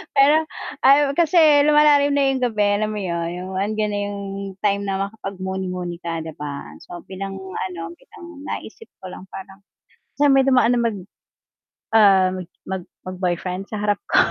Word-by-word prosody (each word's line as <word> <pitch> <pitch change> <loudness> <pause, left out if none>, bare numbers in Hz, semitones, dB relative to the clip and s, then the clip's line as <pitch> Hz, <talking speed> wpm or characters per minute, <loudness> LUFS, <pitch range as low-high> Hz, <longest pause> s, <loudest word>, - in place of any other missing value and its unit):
Pero 280 +2 +6 0.5
ay 280 +1 +6
kasi 340 0 +3 0.3
lumalalim 295 -1 +5
na 280 -1 +3
'yung 270 - 0
gabi, 220 -4 +1
alam 215 +1 -1
mo 210 - -4
'yun, 170 -2 -2
'yung 180 +1 -6
andiyan 210 +2 -1
na 205 - -2
'yung 205 0 -5 0.4
time 200 -1 +1
na 195 - -1
makapag 200 -2 -8
muni-muni 185 -2 -4
ka 165 -1 -4
'di 160 - -7
ba? 145 -1 -7
So, 175 0 -9
bilang 195 0 -6
ano, 185 -2 -5 0.2
bilang - - -15 0.2
naisip 450 - -7 0.2
ko 185 - -8
lang 185 - -10
parang, 195 0 -10 0.6
sa 285 -1 +4
may 270 -1 +5
dumaan 250 -2 +4
na - - +1
mag 230 -3 0 1.0
ah, 195 -4 +6 0.4
mag 190 -1 -4 0.2
mag 185 0 -6
boyfriend 180 +1 -2
sa 215 - -5
harap 205 -1 +1
ko. - - +1
200 Hz, 170 wpm, -21 LUFS, 185-250 Hz, 1.0 s, Pero